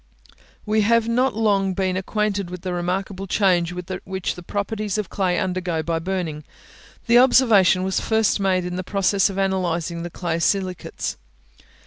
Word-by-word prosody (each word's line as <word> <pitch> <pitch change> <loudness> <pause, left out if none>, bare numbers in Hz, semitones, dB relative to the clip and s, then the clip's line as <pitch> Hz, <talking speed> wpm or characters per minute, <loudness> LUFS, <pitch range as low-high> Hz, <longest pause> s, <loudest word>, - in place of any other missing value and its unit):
We 215 0 +2
have 230 +2 +3
not 250 +2 +1
long 200 -4 +1
been 185 -1 0
acquainted 200 0 -1
with 180 -1 -7
the 185 -1 -3
remarkable 185 +2 -3
change 180 -3 +2 0.3
which 190 -1 -3
the 180 - -10
properties 205 +2 -3
of 210 -4 -3
clay 185 -3 0
undergo 180 -3 -1
by 165 +1 -1
burning. 165 -4 -3 0.6
The 235 0 +6
observation 220 -8 +5
was 190 0 0
first 220 -2 +1
made 185 -2 +1
in 180 0 -4
the 185 - -3
process 195 +1 +2
of 195 - -6
analysing 175 -3 -1
the 175 - -5
clay 170 -1 -3
silicates. 185 0 -2
190 Hz, 155 wpm, -22 LUFS, 180-205 Hz, 0.6 s, The